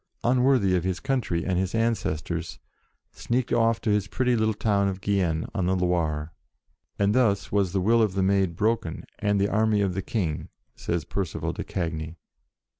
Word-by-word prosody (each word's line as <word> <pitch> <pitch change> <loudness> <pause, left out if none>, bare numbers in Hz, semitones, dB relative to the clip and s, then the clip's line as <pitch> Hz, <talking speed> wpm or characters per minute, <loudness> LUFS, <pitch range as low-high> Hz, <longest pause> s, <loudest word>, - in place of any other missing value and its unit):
unworthy 125 -6 +3
of 90 - 0
his 95 -1 -1
coun 135 -1 0
try 85 -6 -2
and 90 -2 0
his 95 +3 -1
ancestors, 85 -8 -1 0.5
sneaked 120 +1 -2
off 115 -1 +3
to 110 - 0
his 105 -1 +1
pretty 125 +3 +1
little 110 -1 +1
town 100 -2 +1
of 95 -1 -3
Gien, 95 -5 0
on 95 -5 0
the 95 - +2
Loire. 85 -4 -1 0.6
"And 100 0 +2
thus 100 -6 +2
was 100 -3 +1
the 95 0 0
will 115 +5 +4
of 105 -4 +2
the 95 - +1
Maid 95 -3 +2
broken, 105 -4 -1 0.2
and 105 -1 +1
the 100 - +2
army 110 0 +2
of 95 -2 0
the 95 - -2
King," 90 -8 -3 0.3
says 85 -3 -2
Percival 95 -2 -3
de - - -5
Cagny. 80 -2 -4
100 Hz, 185 wpm, -26 LUFS, 90-110 Hz, 0.6 s, will